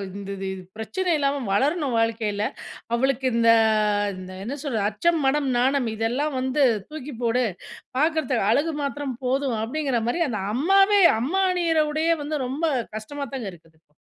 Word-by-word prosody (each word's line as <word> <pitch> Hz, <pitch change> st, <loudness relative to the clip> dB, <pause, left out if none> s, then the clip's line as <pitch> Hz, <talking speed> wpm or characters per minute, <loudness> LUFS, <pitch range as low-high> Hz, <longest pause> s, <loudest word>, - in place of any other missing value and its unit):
இந்த 200 Hz, -1 st, -7 dB, 0.2 s
இது 185 Hz, -, -8 dB, 0.2 s
பிரச்சனை 360 Hz, -, -2 dB
இல்லாம 280 Hz, 0 st, +1 dB, 0.2 s
வளரணும், 280 Hz, -, +1 dB
வாழ்க்கையில. 220 Hz, -2 st, 0 dB, 0.5 s
அவளுக்கு 265 Hz, +1 st, 0 dB
இந்த, 230 Hz, 0 st, +4 dB, 0.7 s
இந்த 185 Hz, 0 st, -9 dB
என்ன 280 Hz, +5 st, -4 dB
சொல்றது? 225 Hz, -8 st, -1 dB
அச்சம், 330 Hz, +10 st, +1 dB
மடம், 275 Hz, 0 st, +2 dB
நாணம் 260 Hz, 0 st, +2 dB
இதெல்லாம் 255 Hz, +6 st, -1 dB
வந்து 260 Hz, +3 st, +1 dB, 0.3 s
தூக்கி 300 Hz, -2 st, -7 dB
போடு! 245 Hz, +2 st, +2 dB, 0.6 s
பார்க்கிறத்து 305 Hz, -5 st, +1 dB
அழகு 305 Hz, +4 st, +1 dB
மாத்திரம் 280 Hz, -1 st, -3 dB
போதும் 260 Hz, -3 st, 0 dB
அப்பிடிங்கிறமாரி 255 Hz, +2 st, -1 dB
அந்த 215 Hz, -5 st, -3 dB
அம்மாவே 390 Hz, +7 st, +4 dB, 0.2 s
அம்மா 370 Hz, +10 st, 0 dB
அணியிற 335 Hz, -3 st, +2 dB
உடையே 320 Hz, +2 st, +2 dB
வந்து 300 Hz, 0 st, -2 dB
ரொம்ப 275 Hz, +6 st, -3 dB, 0.3 s
கஷ்டமாதாங்க 265 Hz, 0 st, -5 dB
இருக்குது. 160 Hz, -1 st, -20 dB
270 Hz, 135 wpm, -24 LUFS, 230-305 Hz, 0.7 s, இந்த